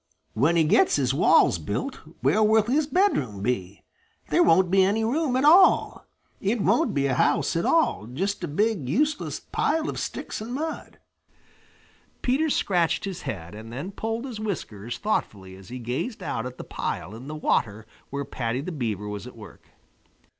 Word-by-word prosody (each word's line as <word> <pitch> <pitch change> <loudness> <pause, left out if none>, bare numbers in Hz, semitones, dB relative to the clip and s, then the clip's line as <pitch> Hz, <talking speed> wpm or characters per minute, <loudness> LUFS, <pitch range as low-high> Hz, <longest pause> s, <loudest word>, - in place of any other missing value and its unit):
When 145 +9 +2
he 165 - +4
gets 155 - +4
his 135 -2 +1
walls 110 - +4
built, 100 - -3 0.2
where 215 - +3
will 215 0 +5
his 280 +7 +1
bedroom 145 - +1
be? 100 -5 -3 0.5
There - - +3
won't 175 +2 +4
be 190 0 +5
any 205 +4 +1
room 265 +3 0
at 260 +2 +2
all. 355 +5 +5 0.3
It 215 +4 0
won't 195 - +2
be 140 -1 +1
a 135 - +1
house 145 +5 +1
at 165 - 0
all 320 - +2
just 190 - -3
a - - -1
big 185 - 0
useless 295 - 0
pile 320 -1 -1
of - - -3
sticks - - -5
and 235 +3 -5
mud." 315 +3 -5 1.3
Peter 280 +6 +1
scratched 180 - +1
his 190 -2 -5
head 85 -3 -6
and 110 +2 -9
then 140 +11 -5
pulled 225 +4 -3
his 240 -5 -6
whiskers 120 - -5
thoughtfully 100 - -3
as 95 +2 -14
he 125 - -6
gazed 125 - -4
out 115 +3 -3
at 125 - -10
the - - -7
pile 90 +6 -4
in 120 +4 -10
the 155 - -5
water 110 -7 0 0.2
where 140 0 -4
Paddy 125 -2 -3
the 180 - -5
Beaver 110 - -3
was 105 +3 -6
at 125 - -12
work. 105 -2 -14
165 Hz, 180 wpm, -25 LUFS, -, 1.3 s, will